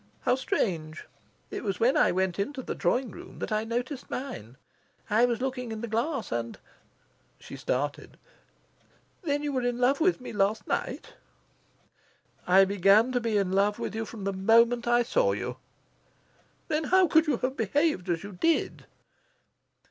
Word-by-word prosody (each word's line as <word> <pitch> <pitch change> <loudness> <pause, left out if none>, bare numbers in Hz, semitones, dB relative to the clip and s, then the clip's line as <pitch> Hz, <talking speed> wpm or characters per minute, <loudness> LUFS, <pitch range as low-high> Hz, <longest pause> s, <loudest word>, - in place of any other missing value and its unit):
"How - - +2
strange! 170 -11 -2 0.5
It - - -5
was 195 -4 -2
when 245 +4 +3
I - - +4
went 185 0 -1
into 260 +6 -3
the - - -4
drawing 250 -2 0
room - - -12
that - - -5
I 215 0 +1
noticed 245 +4 -4
mine. 135 - -6 0.5
I 225 +3 +5
was 240 -1 -1
looking 255 -3 -3
in 220 -1 -5
the 235 - -4
glass, 235 +4 -2
and" 115 0 -3 0.8
She - - -10
started. 145 +3 -3 1.0
"Then 290 -4 -1
you 295 - -1
were 260 - 0
in 245 0 -1
love 260 +4 +2
with 355 -1 +3
me 250 - -8
last 205 +1 0
night?" - - -3 1.3
"I 190 +2 +6
began 200 +5 +4
to 250 - +1
be 230 -3 0
in 195 -2 0
love 200 +2 +2
with - - -4
you 225 0 -3
from 215 -2 -9
the 195 0 -1
moment 230 +5 +3
I 240 0 +4
saw - - +2
you." - - -4 1.1
"Then 310 0 -1
how 370 +3 +4
could 320 +1 +4
you 285 -5 +1
have 260 +2 -2
behaved 230 - 0
as 170 0 -1
you 205 - -7
did?" 320 - 0
230 Hz, 170 wpm, -28 LUFS, 195-265 Hz, 1.3 s, I